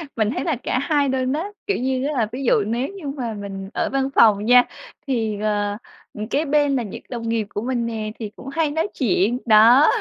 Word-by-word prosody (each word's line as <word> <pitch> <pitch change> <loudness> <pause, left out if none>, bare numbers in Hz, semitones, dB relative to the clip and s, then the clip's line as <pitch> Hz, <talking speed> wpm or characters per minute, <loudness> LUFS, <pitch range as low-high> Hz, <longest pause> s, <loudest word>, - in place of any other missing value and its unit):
Mình 215 -1 +1
thấy - - -2
là 325 -4 0
cả 255 - 0
hai 285 -1 +1
luôn 260 0 0
á, 315 +4 -1 0.2
kiểu 405 - +1
như 260 +1 -1
á, 300 - -2
là 235 -6 +1
ví 265 +3 -5
dụ 230 - +3
nếu 235 +5 -1
như 385 -7 -8
mà 255 -5 -4
mình 195 -2 -7
ở - - -1
văn 270 0 0
phòng 210 -2 +5
nha 245 +1 +7 0.4
thì, 220 -5 -1
ờ, 205 -1 -1 0.4
ừm, 210 0 -5
kế 290 +6 0
bên 290 -1 +2
là 250 - 0
những 205 - -8
đồng 230 -2 -4
nghiệp 225 -2 -1
của 205 - -4
mình 240 0 -1
nè, 220 -2 -4
thì 215 -3 -4
cũng 265 - -12
hay 315 -1 0
nói 320 +6 0
chuyện, 235 -1 +2
đó. 235 +6 +7
245 Hz, 235 wpm, -22 LUFS, 215-275 Hz, 0.4 s, nha